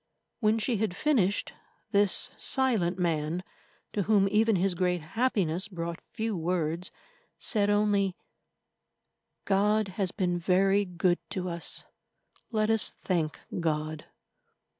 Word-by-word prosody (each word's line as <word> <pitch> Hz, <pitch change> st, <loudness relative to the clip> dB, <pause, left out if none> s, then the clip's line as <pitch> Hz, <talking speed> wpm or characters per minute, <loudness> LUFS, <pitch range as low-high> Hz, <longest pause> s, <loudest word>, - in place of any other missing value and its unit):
When 215 Hz, -1 st, +3 dB
she 225 Hz, +1 st, 0 dB
had 200 Hz, -3 st, -1 dB
finished, 215 Hz, -8 st, +1 dB, 0.4 s
this 205 Hz, -2 st, +2 dB
silent 220 Hz, -10 st, +1 dB
man, 165 Hz, 0 st, -1 dB, 0.5 s
to 205 Hz, -, 0 dB
whom 200 Hz, 0 st, +3 dB
even 220 Hz, +1 st, +3 dB
his 190 Hz, +1 st, +1 dB
great 180 Hz, -2 st, 0 dB
happiness 200 Hz, -7 st, +1 dB
brought 170 Hz, -3 st, -5 dB
few 220 Hz, -1 st, -2 dB
words, 170 Hz, 0 st, -1 dB, 0.5 s
said 205 Hz, -3 st, +2 dB
only: 205 Hz, -2 st, +2 dB, 1.3 s
"God 205 Hz, +1 st, +2 dB
has 190 Hz, -1 st, -2 dB
been 180 Hz, -3 st, -1 dB
very 195 Hz, +3 st, +3 dB
good 175 Hz, 0 st, +1 dB
to 185 Hz, -2 st, -3 dB
us. 170 Hz, -1 st, -5 dB, 0.7 s
Let 215 Hz, -1 st, +1 dB
us 225 Hz, -1 st, +2 dB
thank 165 Hz, -5 st, -1 dB, 0.2 s
God." 155 Hz, -1 st, -2 dB
190 Hz, 120 wpm, -29 LUFS, 175-210 Hz, 1.3 s, When